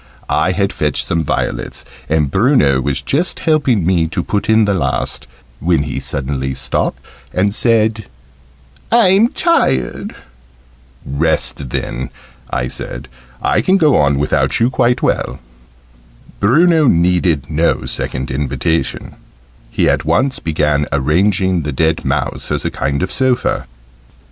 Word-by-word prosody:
I - - +2
had - - 0
fetched - - 0
some 80 0 -1
violets, - - -3 0.2
and 75 -3 +1
Bruno 95 - +3
was 70 0 -2
just 155 - -1
helping 135 - +2
me 85 -2 +2
to 85 +2 -3
put 105 0 -2
in 110 0 +5
the 100 - +1
last, 70 -8 -2 0.3
when 85 -3 +1
he 75 - -4
suddenly 65 -1 -3
stopped - - -2 0.3
and 100 +2 +1
said 110 -2 +2 0.9
"I'm 220 -2 +5
tired." 65 - 0 0.9
"Rest 70 -2 -1
then," 60 +1 -4 0.4
I 60 - -1
said: 65 - -6 0.3
"I - - +2
can 190 +1 +3
go 155 -6 +4
on 70 -1 +3
without 75 +2 +1
you, 120 +3 +2
quite 120 -1 +1
well." - - 0 1.0
Bruno 155 - +4
needed 85 - +2
no 80 +2 +1
second 65 0 -3
invitation: 70 +2 -2 0.6
he - - +1
at - - +1
once 105 - +1
began 75 -2 0
arranging 90 +6 +1
the 75 -1 -3
dead 80 +4 0
mouse - - -2
as - - -1
a - - -1
kind 70 +4 -2
of 95 - -2
sofa. 130 - 0
85 Hz, 135 wpm, -16 LUFS, 70-115 Hz, 1.0 s, in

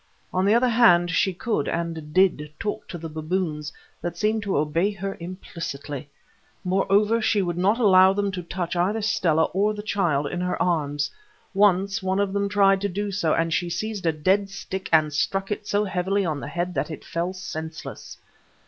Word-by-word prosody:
On 185 +1 +1
the 205 +3 +4
other 245 +2 +4
hand, 175 -8 +5
she 190 +3 +2
could, 185 -3 -2
and 165 -3 -3
did, 170 -4 +2
talk 210 -2 -4
to 175 - -6
the 165 0 -6
baboons, 155 -1 -3 0.3
that 175 0 -4
seemed 215 +3 +1
to 200 -5 -1
obey 160 +6 +1
her 195 -1 -5
implicitly. 160 -5 -6 0.5
Moreover, 200 +4 +2
she 210 -2 +2
would 175 -2 -2
not 195 +5 +2
allow 190 -4 +6
them 200 0 -1
to 185 -1 -4
touch 175 0 -4
either 200 +5 0
Stella 170 -7 +2
or 205 +3 +1
the 210 - -6
child 175 -9 0
in 175 +5 -3
her 180 0 -1
arms. 145 -4 0 0.4
Once 195 -1 +3
one 190 +1 0
of 200 -1 0
them 200 0 0
tried 195 -1 +4
to 200 - 0
do 205 +2 -3
so, 170 -5 +1
and 165 0 0
she 175 +1 0
seized 210 0 -3
a - - +4
dead 190 +6 +1
stick 190 0 -6
and 155 -2 +4
struck 195 +7 -1
it 210 0 -3
so 205 +1 +1
heavily 195 0 0
on 155 -4 -2
the - - -6
head 175 +1 -3
that - - -2
it 155 - -8
fell 170 +2 -2
senseless. 160 -4 -7
185 Hz, 195 wpm, -24 LUFS, 165-200 Hz, 0.5 s, allow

